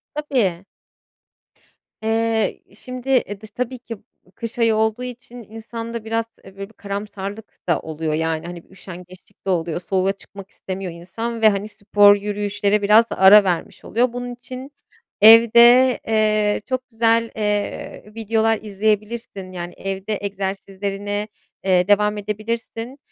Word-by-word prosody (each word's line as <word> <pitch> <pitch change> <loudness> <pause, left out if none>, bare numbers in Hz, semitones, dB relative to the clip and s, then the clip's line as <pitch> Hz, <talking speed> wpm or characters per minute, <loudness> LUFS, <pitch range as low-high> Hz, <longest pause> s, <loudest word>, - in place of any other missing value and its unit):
Tabii. 230 - -1 1.4
Eee, 225 0 0
şimdi 255 +3 -8 0.2
e, 205 0 -8
dış 215 - -11
tabii 250 +3 -4
ki 235 -1 -8 0.4
kış 230 +2 -7
ayı 230 -1 +3
olduğu 220 +2 0
için 245 -1 -9
insanda 230 0 -7
biraz, 225 0 -1 0.2
eee, 195 0 -15
böyle 195 +1 -7
bir 225 - -21
karamsarlık 200 +1 -7
da 170 - +3
oluyor, 160 0 -4
yani, 160 0 -1
hani, 175 -1 -8
bir - - -30
üşengeçlik 185 -1 -13
de 195 - -2
oluyor, 170 -2 0
soğuğa 190 +1 0
çıkmak 195 0 -13
istemiyor 185 -1 -6
insan 225 +7 -6
ve, 220 - +7
hani, 200 +1 -2
spor, 205 -1 +5
yürüyüşlere 205 0 -1
biraz 215 +3 +6
ara 200 +2 +7
vermiş 180 -3 -3
oluyor. 240 +2 +1
Bunun 245 0 -5
için 255 +3 -9 0.5
evde, 235 +3 +7
eee, 215 -1 +2
çok 255 -1 -3
güzel, 230 0 +2
eee, 210 -1 -3
videolar 225 0 +1
izleyebilirsin. 210 -1 -2
Yani, 175 -1 -6
evde 195 +2 -3
egzersizlerine, 200 +1 -4 0.4
eee, 185 -1 +3
devam 210 +1 +3
edebilirsin. 225 +4 -5
210 Hz, 135 wpm, -21 LUFS, 195-230 Hz, 1.4 s, ve